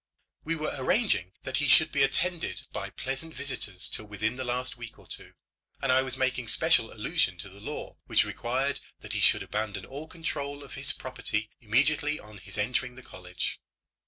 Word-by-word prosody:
We 165 +1 -1
were 155 -1 -2
arranging 130 - +2
that 130 - -1
he 145 - +3
should 155 +3 +7
be 145 - +2
attended 165 +6 +1
by - - -3
pleasant 135 +5 -3
visitors 125 -9 +2
till 110 - 0
within 105 +3 -2
the 130 - -4
last 125 +1 -1
week 120 -2 -9
or - - -17
two, - - -3 0.5
and 135 - +1
I 130 +1 +5
was 130 -1 -1
making 125 -2 0
special - - +3
allusion 95 -2 0
to 95 +3 -7
the 100 +2 -14
law - - -6
which - - +4
required - - -1 0.2
that - - -4
he - - +1
should - - +6
abandon 105 -3 -3
all 145 +4 -7
control 145 -4 -4
of 135 - -11
his 135 +1 +3
property 110 -5 -2
immediately 145 +6 +2
on 105 -1 -12
his 95 - -6
entering 125 +4 0
the 130 - -12
college. 90 -1 -4
130 Hz, 190 wpm, -29 LUFS, 105-145 Hz, 0.5 s, should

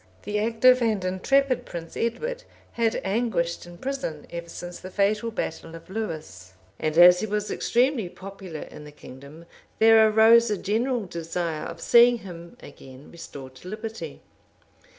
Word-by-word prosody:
The 210 0 -2
active 235 +4 +4
and 215 -5 0
intrepid 255 +8 +1
Prince 165 -1 -8
Edward 475 - -3 0.3
had 230 -1 0
anguished 190 -6 -1
in 175 0 -12
prison 265 - -5
ever 170 0 -7
since 175 +1 -8
the 185 - -9
fatal 210 +4 0
battle 165 -6 -5
of 165 +2 -13
Lewes; 150 - -6 0.3
and 155 0 -2
as 180 +1 +8
he 215 - -2
was 210 0 -2
extremely 245 -5 +1
popular 190 -4 -9
in 150 - -10
the 150 - -11
kingdom 140 +3 -13 0.3
there 220 0 +6
arose 225 +2 +6
a 210 - 0
general 230 +4 -1
desire 165 -2 -4
of 165 0 -9
seeing 240 0 +6
him 170 -5 -11
again 135 -1 -13
restored 140 -6 -10
to 175 - -13
liberty. 220 +3 -7
195 Hz, 150 wpm, -25 LUFS, 165-225 Hz, 0.3 s, as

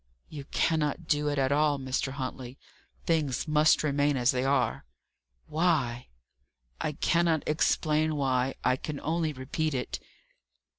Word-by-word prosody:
"You 145 -3 -8
cannot 160 +2 0
do 150 0 +1
it 145 0 -1
at 135 0 +1
all, 145 0 +3
Mr. 130 0 -2
Huntley. 130 -1 -6 0.5
Things 155 -4 0
must 155 0 +4
remain 145 -1 +1
as 125 0 +3
they 130 -1 -1
are." 135 -4 +1 0.6
"Why?" 150 -7 0 0.7
"I 150 - -2
cannot 170 0 +1
explain 155 0 +1
why. 130 -2 0
I 125 - +2
can 145 +1 -5
only 160 0 0
repeat 145 +3 -3
it." 125 - -3
145 Hz, 135 wpm, -28 LUFS, 130-155 Hz, 0.7 s, must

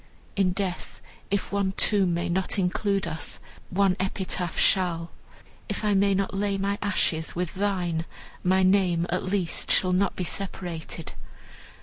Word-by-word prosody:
In 195 -2 +3
death, 185 -1 -4 0.3
if 200 0 -1
one 200 -1 0
tomb 195 -4 +4
may 170 - -1
not 185 +4 -1
include 195 +1 +1
us, 160 - -3 0.3
one 195 0 +3
epitaph 185 -2 -2
shall; 170 -4 +2 0.6
if - - -2
I 210 - +3
may 200 0 +3
not 195 0 -1
lay 200 0 0
my 200 +1 -1
ashes 170 -5 0
with 175 -1 -2
thine, 180 -5 -1 0.4
my 185 +1 +3
name, 185 -3 +3
at 180 - +1
least, 185 -3 -1
shall 185 - +3
not 185 +1 +2
be 185 - -2
separated." 175 -3 -4
190 Hz, 145 wpm, -26 LUFS, 175-200 Hz, 0.6 s, tomb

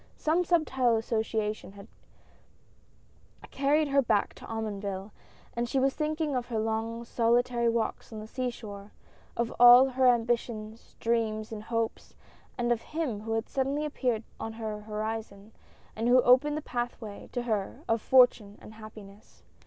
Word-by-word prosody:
Some 325 +4 +1
subtile 265 -9 +2
association 220 -2 -2
had 200 +1 -12 1.6
carried 290 +2 +2
her 275 0 +4
back 220 -5 +1
to - - -11
Omonville, 205 -2 -4 0.4
and 235 0 -2
she 270 - +1
was 270 +1 +2
thinking 305 -1 -2
of 245 -1 -2
her 235 -2 -3
long 225 +1 -2
solitary 235 0 +2
walks 230 0 -2
on 220 - -7
the 215 - -7
sea 255 +3 -3
shore 205 -4 -10 0.2
— - - -29
of 235 -1 -1
all 245 +2 +9
her 260 0 +2
ambitious 230 -2 -1
dreams 225 -2 -1
and 215 -1 -6
hopes, 230 0 -3 0.4
and 240 -1 0
of 235 -1 +1
him 305 -9 -3
who 225 +1 -4
had 225 +1 -1
suddenly 275 +3 -1
appeared 250 -6 -1 0.2
on 225 - -5
her 220 -2 -5
horizon, 215 -1 -5 0.4
and 225 +2 -1
who 250 +1 +6
opened 295 +5 +4
the 305 - -5
pathway 240 -5 -5
to 245 - -3
her 215 -5 -2
of 225 -1 +1
Fortune 245 -6 +4
and 215 - -13
Happiness. 215 -2 -14
230 Hz, 155 wpm, -29 LUFS, 215-250 Hz, 1.6 s, all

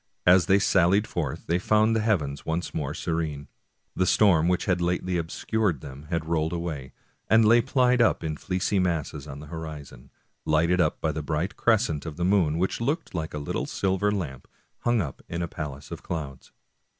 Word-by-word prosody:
As 90 0 +6
they 95 0 +5
sallied 95 +1 +3
forth 80 -10 -4
they 85 +2 +1
found 110 +3 +3
the - - +2
heavens 80 -11 0
once 80 +2 -3
more 75 -1 -3
se 85 - -3
rene. 75 -3 -2 0.5
The 95 - +1
storm 85 -6 +4
which 90 0 +1
had 90 -2 +1
lately 90 +1 0
obscured 90 - -1
them 70 +2 -10
had 85 -2 -1
rolled 80 0 0
away, 80 -7 -4 0.4
and 110 +2 +6
lay 115 +2 +6
piled 125 -1 +2
up 110 - +3
in 80 -1 -2
fleecy 95 +4 -1
masses 80 -5 -2
on 70 -1 -7
the - - -9
horizon, 75 -5 -8 0.3
lighted 85 +4 +2
up 75 - 0
by 80 - +1
the 75 +1 -4
bright 80 +7 -2
crescent 105 -10 +1
of 80 -1 -6
the 90 - 0
moon, 90 -5 +2
which 95 +6 -1
looked 145 +8 -2
like 80 -3 -4
a - - -2
little 75 0 -3
silver 100 +1 0
lamp 75 -11 -4 0.3
hung 120 -2 +2
up 70 -7 -6
in 85 +1 -2
a - - -2
palace 75 -4 -7
of - - -6
clouds. 75 -6 -6
85 Hz, 195 wpm, -26 LUFS, 75-100 Hz, 0.5 s, As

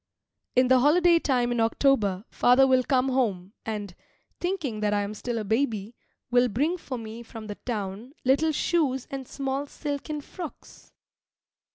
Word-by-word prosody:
In 255 0 +5
the 260 0 +5
holiday 335 +5 +5
time 250 -5 +1
in 240 - 0
October 225 -4 +2
father 250 +2 +5
will 260 -1 +4
come 260 -1 +1
home 205 -8 -1
and, 205 -4 -4 0.5
thinking 330 - -2
that 210 -1 +1
I 205 - +1
am 200 +1 -4
still 235 +2 -4
a 220 - -2
baby, 220 -1 -1 0.4
will 245 0 +5
bring 295 - 0
for 260 -5 -5
me 225 0 -7
from 225 -1 -9
the 210 - -5
town 215 +2 -4
little 280 +5 +3
shoes 290 -5 0
and 270 -2 -5
small 275 +1 -3
silken 295 +1 -4
frocks. 335 +1 -10
255 Hz, 160 wpm, -26 LUFS, 220-280 Hz, 0.5 s, In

